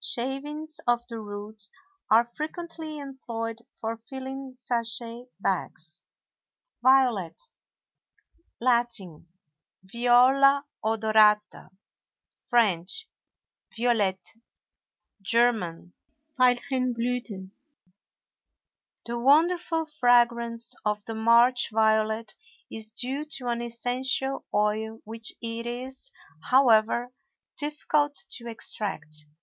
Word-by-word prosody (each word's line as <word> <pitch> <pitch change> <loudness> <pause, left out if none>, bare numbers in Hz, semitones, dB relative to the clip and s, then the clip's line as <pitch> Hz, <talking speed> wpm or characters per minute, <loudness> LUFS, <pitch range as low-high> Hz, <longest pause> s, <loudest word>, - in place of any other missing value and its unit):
Shavings 290 +5 -2
of 240 0 +2
the 230 -1 -5
root 205 0 -7 0.4
are 225 +2 +6
frequently 315 +4 -6
employed 235 -5 -5 0.2
for 225 +1 -3
filling 265 +3 -8
sachet 235 -1 -2
bags. 170 -3 -3 0.8
VIOLET. 255 -9 +3 1.2
Latin—Viola 240 - +2 0.2
odorata; 215 -2 +3 0.8
French—Violette; 220 - -1 1.0
German—Veilchenblüthen. 240 - -1 1.5
The 235 0 -3
wonderful 325 +5 +3
fragrance 240 -4 +2
of 210 -1 -1
the 225 - -5
March 235 +3 +4
violet 220 0 +1 0.4
is 220 -1 -9
due 255 +6 -3
to 250 -2 -4
an 235 0 -1
essential 250 +3 -2
oil 215 +2 0
which 225 +1 -6
it 230 +1 -4
is, 260 - -7 0.4
however, 245 -1 +4 0.4
difficult 295 0 0 0.2
to 235 -1 -7
extract. 155 -9 -6
235 Hz, 75 wpm, -27 LUFS, 220-260 Hz, 1.5 s, are